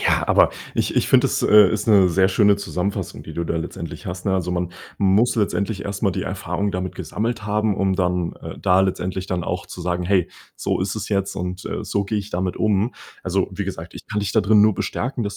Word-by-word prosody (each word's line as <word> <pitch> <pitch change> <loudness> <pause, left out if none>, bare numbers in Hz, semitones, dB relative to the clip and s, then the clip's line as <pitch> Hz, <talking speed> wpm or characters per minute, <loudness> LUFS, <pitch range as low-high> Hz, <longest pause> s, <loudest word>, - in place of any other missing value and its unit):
Ja, - - +2
aber - - +5 0.2
ich - - 0
ich - - +3
finde, - - +5
das, - - -1
äh, 105 -2 +7
ist 105 -1 -2
'ne 100 -4 +6
sehr 95 +2 +3
schöne 100 +1 +4
Zusammenfassung, 100 -1 -3
die - - -9
du 85 - -2
da 85 - -2
letztendlich 80 - -6
hast, 90 +1 -5
ne? 95 - +1
Also, 90 -2 0
man 90 0 -2 0.2
muss 100 +5 +3
letztendlich 100 -1 -1
erst 100 0 -5
mal 100 - +3
die - - -3
Erfahrung 95 +1 -2
damit 90 0 -3
gesammelt 110 0 -3
haben, 105 -1 +1
um 95 -1 +1
dann, 90 -2 0
äh, - - -8
da 90 +1 +3
letztendlich 95 0 -1
dann 90 -3 -2
auch 90 0 -3
zu 90 - -8
sagen: 90 0 -1
„Hey, 90 -2 +2 0.3
so - - -1
ist 95 +2 -1
es 110 - -5
jetzt 100 -1 -1
und, 90 +1 -4
äh, - - -4
so 100 0 -1
gehe 105 +2 -2
ich 100 +1 -6
damit 90 0 -2
um.“ 105 +2 +1 0.3
Also, 95 +1 0
wie 100 +2 -4
gesagt, 90 -3 -6
ich - - -11
kann 105 -1 -2
dich 100 0 -2
dadrin 105 -1 +5
nur 105 -1 +4
bestärken, 125 +3 -2
das 100 0 -4
95 Hz, 235 wpm, -22 LUFS, 90-105 Hz, 0.3 s, äh